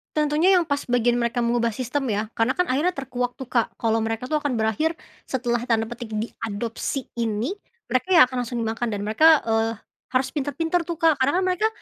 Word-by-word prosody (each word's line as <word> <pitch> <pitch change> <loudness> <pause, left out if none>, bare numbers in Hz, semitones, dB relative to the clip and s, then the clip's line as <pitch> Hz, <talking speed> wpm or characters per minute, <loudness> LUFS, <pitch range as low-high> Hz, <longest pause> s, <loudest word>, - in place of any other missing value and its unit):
Tentunya 305 +5 +3
yang 350 - +4
pas 285 -3 -1
bagian 240 0 +2
mereka 235 0 0
mengubah 235 -1 +1
sistem, 265 +2 -2
ya. 215 +1 -2
Karena, 225 +3 0
kan, 360 -6 +1
akhirnya 330 +7 +1
terkuak 250 -2 -3
tuh, 260 -2 -9
Kak, 235 -3 0
kalau 225 0 +1
mereka 225 +4 -3
tuh 305 - +2
akan 290 -4 -1
berakhir 230 +10 0 0.3
setelah 240 -2 -1
tanda 225 -2 +2
petik 240 -1 -6
diadopsi 230 +4 -4
ini. 225 - -1 0.4
Mereka 255 +7 +1
ya 315 - +10
akan 250 -2 -1
langsung 245 - -5
dimakan 225 +2 -2
dan 200 - -4
mereka, 310 +9 +5
eee, 225 0 0 0.4
harus 260 +1 +3
pintar-pintar 325 +4 -1
tuh, 340 - -2
Kak, 320 -4 +3
karena, 265 +2 +3
kan, 375 - +2
mereka 370 +4 +2
250 Hz, 200 wpm, -24 LUFS, 230-300 Hz, 0.4 s, ya